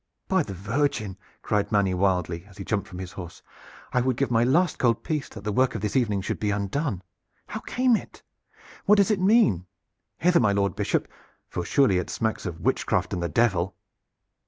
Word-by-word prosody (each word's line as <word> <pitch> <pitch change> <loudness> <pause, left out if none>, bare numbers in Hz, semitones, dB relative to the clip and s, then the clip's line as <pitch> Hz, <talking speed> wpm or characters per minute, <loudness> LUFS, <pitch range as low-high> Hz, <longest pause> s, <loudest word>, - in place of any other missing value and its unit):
"By 190 -1 +3
the 100 -10 -5
Virgin!" 105 0 -1 0.3
cried 105 0 0
Manny 100 -3 +2
wildly, 90 -3 0
as 100 -1 -18
he 100 - -6
jumped 105 -2 -1
from 90 - -9
his 90 -1 -6
horse, 90 -3 -9 0.5
"I 125 - +3
would 130 -1 0
give 140 -2 0
my 115 0 +4
last 165 +8 +2
gold 115 -3 +2
piece 150 -3 -2
that 100 - -10
the 105 - -1
work 130 +4 +2
of 110 - -3
this 105 -1 -2
evening 105 -7 +2
should 95 - -3
be 105 - 0
undone! 100 - -2 0.4
How - - -5
came 255 -1 +2
it? - - -7 0.6
What 210 +1 +6
does 200 +1 +4
it 200 -3 +1
mean? 185 - +4 0.5
Hither, 175 0 +4
my 105 -4 +3
Lord 100 0 +1
Bishop, - - 0 0.4
for 90 - -4
surely 100 -2 +3
it 90 - -4
smacks 110 -3 -2
of 85 -2 -6
witchcraft - - 0
and 90 - -2
the 85 - -1
Devil." 95 -1 +1
105 Hz, 200 wpm, -26 LUFS, 95-135 Hz, 0.6 s, What